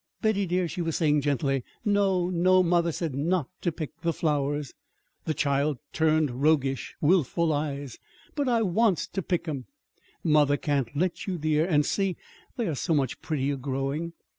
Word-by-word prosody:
"Betty, 205 -3 +1
dear," 180 0 +1
she 175 +2 -4
was 165 -2 -1
saying 150 -3 +2
gently, 135 -2 0 0.2
"no, 195 -3 +2
no! 185 +1 +4
Mother 170 -1 +2
said 160 -2 -3
not 160 +3 0
to 175 - 0
pick 155 0 -7
the 170 0 +1
flowers." 145 -3 -1 0.5
The 155 - -1
child 140 0 +1 0.2
turned 155 -5 +1
roguish, 140 -3 +1
willful 165 0 +2
eyes. 145 -3 -3 0.3
"But 285 -3 0
I 230 -2 +3
wants 200 -1 +2
to 195 - -4
pick 175 -1 -2
'em." 140 -5 -4 0.6
"Mother 150 -3 +4
can't 140 -3 -1
let 180 +4 -1
you, 185 -2 -1
dear. 155 +1 +1
And 150 -5 +3
see, 195 +1 0 0.4
they 235 -4 0
are 165 - -1
so 160 +4 0
much 135 -4 -1
prettier 140 -2 -1
growing!" 135 +5 -3
155 Hz, 165 wpm, -27 LUFS, 145-180 Hz, 0.6 s, no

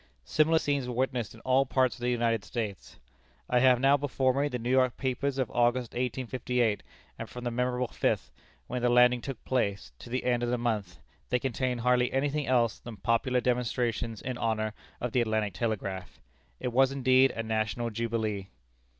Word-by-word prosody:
Similar 160 +1 +3
scenes 145 -4 0
were 125 - -4
witnessed 125 -3 -1
in 110 - -15
all 130 +1 +3
parts 130 -1 +1
of - - -13
the 120 - 0
United 115 -3 +1
States. 110 -6 -5 0.5
I 125 - +3
have 125 -1 +5
now 135 +2 +5
before 130 -2 +1
me 140 +2 +1
the 125 - -3
New 120 +1 -3
York 130 -1 +3
papers 135 +1 -1
of 130 -4 -1
August, 120 0 +1
1858, 125 -2 -1 0.4
and - - -6
from 125 - -8
the 120 - -2
memorable 125 +1 0
fifth, - - -1 0.3
when 125 0 -4
the 125 - +3
landing 125 0 +5
took 135 -1 -7
place, 100 - -1
to - - -11
the 125 +2 -2
end 120 -1 +1
of 120 - 0
the 125 - +1
month, 110 -7 -2 0.3
they 125 - +3
contain 125 0 -1
hardly 125 +1 +2
any 135 +2 +1
thing 150 0 -2
else 120 -3 +2
than 115 -3 -9
popular 115 +5 +1
demonstrations 120 -2 -1
in 125 -1 -4
honor 110 -1 -1 0.3
of 125 - -3
the 125 - +2
Atlantic 110 -3 0
Telegraph. 100 -5 -3 0.4
It 125 - -3
was 135 +1 +4
indeed 130 -1 +4
a 115 - -2
national 110 +1 -1
jubilee. 110 -3 -2
125 Hz, 190 wpm, -29 LUFS, 115-130 Hz, 0.5 s, have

